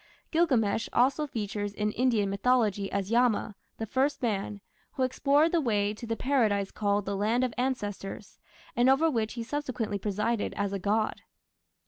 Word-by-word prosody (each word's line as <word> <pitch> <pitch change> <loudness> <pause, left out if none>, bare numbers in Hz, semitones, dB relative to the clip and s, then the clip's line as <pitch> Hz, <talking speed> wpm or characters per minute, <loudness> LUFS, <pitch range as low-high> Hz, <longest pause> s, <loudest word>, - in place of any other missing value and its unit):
Gilgamesh 245 -11 +2
also 275 +5 +2
figures 205 -4 -4
in 210 0 0
Indian 230 -4 +1
mythology 205 -1 +1
as 200 +1 -2
Yama, 235 -3 +2 0.2
the 225 - -3
first 270 +6 0
man, 205 -2 -1 0.3
who 265 - -1
explored 280 +5 +3
the 340 - +2
way 210 -5 +1
to 230 +2 -9
the 225 - -1
Paradise 220 -7 +1
called 205 -1 0
"The 200 - -2
Land 220 +5 +1
of 250 -3 -1
Ancestors", 210 -5 -4 0.4
and 245 +2 +4
over 310 +5 +4
which 220 -4 -1
he 235 -1 -4
subsequently 235 -5 -3
presided 210 +3 -1
as 200 -1 -1
a 200 - -2
god. 210 +3 0
225 Hz, 160 wpm, -28 LUFS, 205-255 Hz, 0.4 s, and